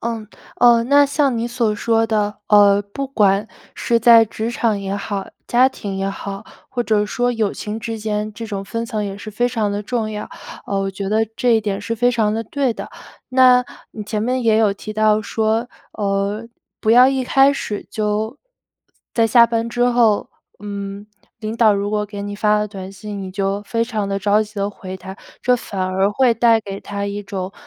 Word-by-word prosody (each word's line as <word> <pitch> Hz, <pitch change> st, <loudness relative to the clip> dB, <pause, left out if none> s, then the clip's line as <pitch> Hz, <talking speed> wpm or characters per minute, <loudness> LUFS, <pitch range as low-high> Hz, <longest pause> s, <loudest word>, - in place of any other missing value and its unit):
嗯， 225 Hz, -2 st, -4 dB, 0.3 s
呃， 240 Hz, -1 st, +6 dB
那 285 Hz, +3 st, +5 dB
像 275 Hz, -4 st, +1 dB
你 230 Hz, -, -1 dB
所 240 Hz, -2 st, 0 dB
说 225 Hz, +1 st, +2 dB
的， 210 Hz, -1 st, -1 dB
呃， 205 Hz, -1 st, +6 dB
不 205 Hz, +7 st, -5 dB
管 205 Hz, -5 st, +2 dB, 0.3 s
是 235 Hz, -1 st, +1 dB
在 230 Hz, 0 st, +7 dB
职 220 Hz, +1 st, -4 dB
场 225 Hz, -4 st, 0 dB
也 195 Hz, 0 st, -3 dB
好， 200 Hz, -1 st, -4 dB, 0.2 s
家 250 Hz, +2 st, +4 dB
庭 200 Hz, -6 st, -6 dB
也 195 Hz, 0 st, -1 dB
好， 195 Hz, +1 st, -7 dB, 0.2 s
或 245 Hz, -2 st, -2 dB
者 210 Hz, -2 st, +1 dB
说 245 Hz, +3 st, 0 dB
友 220 Hz, -4 st, 0 dB
情 210 Hz, +1 st, -5 dB
之 225 Hz, 0 st, -4 dB
间， 210 Hz, 0 st, -2 dB
这 220 Hz, +3 st, -7 dB
种 200 Hz, -3 st, -5 dB
分 230 Hz, +3 st, -4 dB
层 215 Hz, -2 st, -3 dB
也 195 Hz, 0 st, -5 dB
是 215 Hz, +1 st, -8 dB
非 240 Hz, +4 st, 0 dB
常 225 Hz, -4 st, -1 dB
地 205 Hz, +1 st, -2 dB
重 220 Hz, 0 st, -2 dB
要。 210 Hz, -1 st, -6 dB, 0.4 s
呃， 195 Hz, -1 st, -1 dB
我 195 Hz, 0 st, -2 dB
觉 195 Hz, 0 st, -5 dB
得 220 Hz, +2 st, +2 dB
这 250 Hz, -, +1 dB
一 -, -, +1 dB
点 205 Hz, -2 st, -3 dB
是 230 Hz, +3 st, -3 dB
非 245 Hz, +2 st, +2 dB
常 220 Hz, -3 st, +1 dB
地 225 Hz, -, -2 dB
对 260 Hz, +1 st, -1 dB
的， -, -, -7 dB, 0.4 s
那 255 Hz, -1 st, +5 dB, 0.3 s
你 215 Hz, -, -6 dB
前 210 Hz, 0 st, -3 dB
面 250 Hz, +3 st, 0 dB
也 220 Hz, -1 st, +3 dB
有 210 Hz, -3 st, +3 dB
提 215 Hz, +1 st, -8 dB
到 215 Hz, 0 st, +2 dB
说， 220 Hz, +3 st, 0 dB, 0.2 s
呃， 200 Hz, +2 st, -2 dB, 0.3 s
不 220 Hz, -, +1 dB
要 250 Hz, +2 st, +8 dB
一 270 Hz, -1 st, 0 dB
开 270 Hz, +2 st, +4 dB
始 210 Hz, -7 st, -5 dB
就 215 Hz, +3 st, -2 dB, 0.8 s
在 230 Hz, -, +3 dB
下 235 Hz, +1 st, +6 dB
班 230 Hz, 0 st, -1 dB
之 245 Hz, +1 st, 0 dB
后， 235 Hz, -4 st, +2 dB, 0.3 s
嗯， 200 Hz, 0 st, -6 dB, 0.3 s
领 220 Hz, 0 st, -4 dB
导 220 Hz, -3 st, +5 dB
如 200 Hz, +1 st, -2 dB
果 210 Hz, 0 st, -1 dB
给 205 Hz, -1 st, -7 dB
你 205 Hz, 0 st, -5 dB
发 210 Hz, 0 st, +2 dB
了 210 Hz, -, -1 dB
短 190 Hz, -2 st, -8 dB
信， 205 Hz, +1 st, -7 dB
你 190 Hz, -, -6 dB
就 195 Hz, +1 st, -1 dB
非 230 Hz, +2 st, -1 dB
常 215 Hz, -4 st, -3 dB
地 195 Hz, 0 st, -1 dB
着 205 Hz, +2 st, +2 dB
急 215 Hz, 0 st, -12 dB
地 200 Hz, 0 st, -1 dB
回 190 Hz, -2 st, -8 dB
他， 190 Hz, +1 st, -10 dB, 0.3 s
这 250 Hz, -, +4 dB
反 200 Hz, -5 st, -6 dB
而 190 Hz, +2 st, +1 dB
会 250 Hz, +2 st, +3 dB
带 230 Hz, -1 st, +4 dB
给 200 Hz, -2 st, -7 dB
他 200 Hz, 0 st, -5 dB
一 200 Hz, +1 st, -4 dB
种， 190 Hz, -1 st, -5 dB
215 Hz, 225 characters per minute, -19 LUFS, 200-230 Hz, 0.8 s, 要